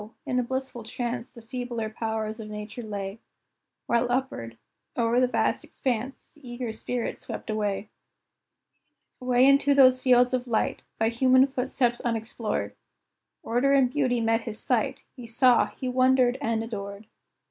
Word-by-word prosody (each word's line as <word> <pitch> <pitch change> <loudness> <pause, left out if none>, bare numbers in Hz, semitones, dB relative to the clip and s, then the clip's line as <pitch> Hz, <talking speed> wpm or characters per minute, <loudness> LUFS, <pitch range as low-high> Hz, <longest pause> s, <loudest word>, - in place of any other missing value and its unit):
in 250 - 0
a - - +1
blissful 260 0 -4
trance 240 +1 -4
The 235 -2 -14
feebler 240 -2 -4
powers 220 0 -3
of 215 -1 -7
Nature 210 +3 -7
lay, 205 -1 -5 0.7
While 235 +1 +1
upward, 180 - -2 0.4
o'er 235 0 +2
the 255 - +4
vast 245 - 0
expanse, 255 0 -4
His 300 - -20
eager 240 -2 -5
spirit 240 +2 -4
swept - - -6
away, 210 -1 -2 1.3
Away 250 0 +4
into 280 +1 +5
those 255 -2 +6
fields 250 -1 +4
of 250 0 -1
light, 225 -2 0 0.2
By 225 0 +2
human 255 +2 +5
footsteps 255 -2 -1
unexplored; 225 -1 -2 0.7
Order 250 +4 +2
and 260 -3 +4
beauty 255 -4 +1
met 225 0 +2
his 225 -2 -5
sight - - 0
He 245 -4 -9
saw, 245 +1 +4
he 260 - -7
wondered, 255 0 +3
and 225 -4 0
adored! 200 -2 -6
240 Hz, 145 wpm, -26 LUFS, 225-255 Hz, 1.3 s, those